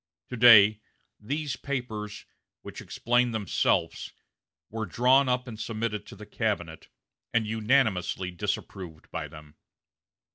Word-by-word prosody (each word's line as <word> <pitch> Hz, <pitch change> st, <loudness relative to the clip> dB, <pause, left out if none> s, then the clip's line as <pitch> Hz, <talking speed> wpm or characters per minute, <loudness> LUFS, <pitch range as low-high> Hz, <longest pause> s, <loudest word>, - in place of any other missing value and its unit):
To 125 Hz, -, -5 dB
day, 110 Hz, -3 st, +7 dB, 0.4 s
these 145 Hz, +6 st, -3 dB
papers, 110 Hz, -7 st, -5 dB, 0.4 s
which -, -, -9 dB
explain 120 Hz, 0 st, 0 dB
themselves, 105 Hz, -4 st, 0 dB, 0.6 s
were 110 Hz, -1 st, -4 dB
drawn 130 Hz, +7 st, +3 dB
up 125 Hz, +1 st, 0 dB
and 110 Hz, -3 st, -8 dB
submitted 110 Hz, -2 st, -3 dB
to -, -, -11 dB
the 105 Hz, +2 st, -11 dB
cabinet, 85 Hz, -9 st, -3 dB, 0.5 s
and 115 Hz, -2 st, +3 dB
unanimously 105 Hz, -5 st, +1 dB
disapproved 85 Hz, -1 st, -5 dB
by -, -, -4 dB
them. 75 Hz, -1 st, -14 dB
110 Hz, 115 wpm, -27 LUFS, 100-125 Hz, 0.6 s, day